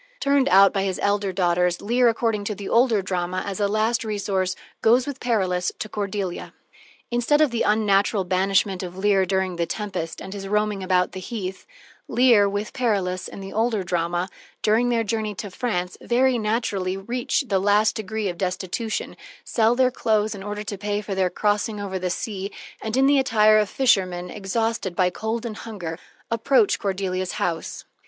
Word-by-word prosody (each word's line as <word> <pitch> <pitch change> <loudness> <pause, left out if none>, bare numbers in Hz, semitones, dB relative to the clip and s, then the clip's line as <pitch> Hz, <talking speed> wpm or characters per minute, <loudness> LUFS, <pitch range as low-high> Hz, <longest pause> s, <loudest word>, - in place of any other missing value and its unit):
Turned 280 - +2
out 195 0 +6
by 195 - 0
his 190 -2 -2
elder 200 -1 +1
daughters, 180 -1 +1
Leir, 240 +3 +3
according 225 -2 0
to 210 - -2
the 200 0 -7
older 230 -4 +3
drama, 185 0 -2
as 200 -1 -4
a 205 - +2
last 220 +4 +1
resource, 195 -4 -1 0.3
goes 240 +3 +4
with 280 -2 -5
Perillus 185 -7 0
to - - -4
Cordelia. 200 -3 -4 0.6
Instead 240 +5 +2
of 305 -4 +4
the 235 - -1
unnatural 205 -1 +2
banishment 190 +1 +1
of 180 -1 -7
Lear 195 -1 +2
during 190 -1 0
the 170 -1 0
tempest, 195 -6 -4
and 190 - -7
his 195 -1 -6
roaming 210 -1 0
about 185 -1 +1
the 190 - -6
heath, 190 -1 -6 0.4
Leir, 235 -4 +5
with 205 +1 -3
Perillus, 195 -8 -1
in - - -9
the 195 - -8
older 220 -2 +1
drama, 175 0 -1 0.4
during 225 +3 +3
their 230 -1 +1
journey 215 -1 -2
to 200 +1 -6
France, 180 -5 -3
very 250 +1 +2
naturally 210 -4 -1
reach 240 +8 -1
the 195 -3 +2
last 205 +2 +3
degree 220 0 -3
of 175 -2 -4
destitution, 190 +4 -3 0.3
sell 230 0 +2
their 255 0 +3
clothes 215 -3 +1
in 200 - -8
order 205 +1 -5
to 200 -2 -6
pay 205 0 -1
for 205 -1 -5
their 190 -1 +1
crossing 210 +3 0
over 190 -2 -3
the 180 0 -2
sea, 195 +1 -4 0.3
and, 220 +3 -2
in 265 - +5
the 280 0 +5
attire 215 -4 +5
of 210 -2 0
fishermen, 185 -9 +1
exhausted 210 -1 -2
by 180 0 +2
cold 220 +4 -3
and 220 -2 -5
hunger, 180 -8 -6 0.3
approach 270 - +3
Cordelia's 185 -2 -2
house. 165 -2 -3
205 Hz, 180 wpm, -23 LUFS, 185-225 Hz, 0.6 s, out